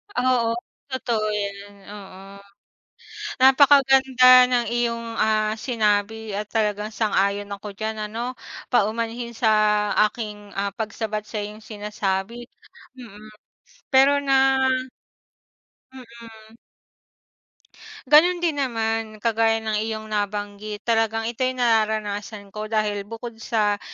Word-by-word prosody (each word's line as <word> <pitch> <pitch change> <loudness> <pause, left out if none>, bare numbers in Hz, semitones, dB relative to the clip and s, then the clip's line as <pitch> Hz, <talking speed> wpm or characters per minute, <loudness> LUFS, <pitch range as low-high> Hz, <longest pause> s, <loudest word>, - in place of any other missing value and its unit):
Oo 245 -2 +1 0.3
totoo 235 -5 -2
yan, 200 0 -6
oo. 195 -1 -12 1.0
Napakaganda 265 -2 +6
ng 245 -1 +1
iyong, 235 -1 -1
ah, 215 -1 +1
sinabi 220 -2 -1
at 210 +1 -4
talagang 210 -1 -1
sang-ayon 205 -2 0
ako 205 +1 -8
diyan 215 -1 -4
ano 235 +3 -4 0.4
paumanhin 230 +2 0
sa 215 -2 +2 0.2
aking, 210 -3 -8
ah, 200 0 -2
pagsabat 215 0 -4
sa - - -5
iyong 210 +1 -6
sinasabi, 210 +2 -4 0.5
mm, 215 -3 -12 0.6
pero 270 +2 +5
nga 270 -1 +3 1.3
Mm. 230 -3 -14 1.5
Ganun 315 +6 +5
din 315 -4 0
naman 225 -3 -2
kagaya 225 0 +1
ng 215 -1 -1
iyong 220 0 -4
nabanggit 205 0 -4
talagang 225 -1 +1
ito'y 255 +2 -2
nararanasan 215 -3 -1
ko 215 0 -6
dahil 215 -2 0
bukod 230 0 -8
sa 210 -3 0
220 Hz, 105 wpm, -23 LUFS, 210-240 Hz, 1.5 s, Napakaganda